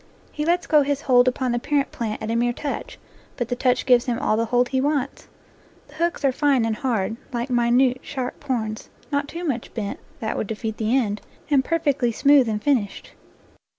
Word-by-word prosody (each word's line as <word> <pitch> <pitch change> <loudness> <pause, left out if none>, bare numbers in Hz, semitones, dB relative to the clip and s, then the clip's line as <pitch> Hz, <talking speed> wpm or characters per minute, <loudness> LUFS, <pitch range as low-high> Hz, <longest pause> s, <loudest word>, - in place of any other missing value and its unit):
He 300 - -3
lets 345 +1 +1
go 300 -1 +5
his 285 0 -1
hold 250 -3 +4
upon 255 0 0
the 240 - 0
parent 285 +2 0
plant 220 -2 -4
at 220 - -2
a - - 0
mere 240 +1 +1
touch, 285 +3 -5 0.4
but 240 -2 -2
the 245 - 0
touch 250 0 +1
gives 245 -2 +5
him 240 -2 0
all 260 -4 +1
the 230 +1 +1
hold 245 +2 +2
he 260 -1 +1
wants. 280 -1 -1 0.6
The - - -16
hooks 340 -4 -1
are 270 - +4
fine 270 -3 +2
and 225 -1 0
hard, 225 -3 -1
like 240 +1 -3
minute, 245 +1 +3
sharp 260 -2 -5
horns, 220 -5 -3 0.2
not 285 0 0
too 340 +4 -6
much 260 -8 -3
bent, 205 -3 -4 0.2
that 220 - -2
would - - -2
defeat 220 0 -4
the 225 +4 +1
end, 210 -5 -1 0.3
and 275 -2 +4
perfectly 285 -6 +1
smooth 275 0 +4
and 210 -1 -2
finished. 245 -9 0
250 Hz, 205 wpm, -23 LUFS, 230-280 Hz, 0.6 s, go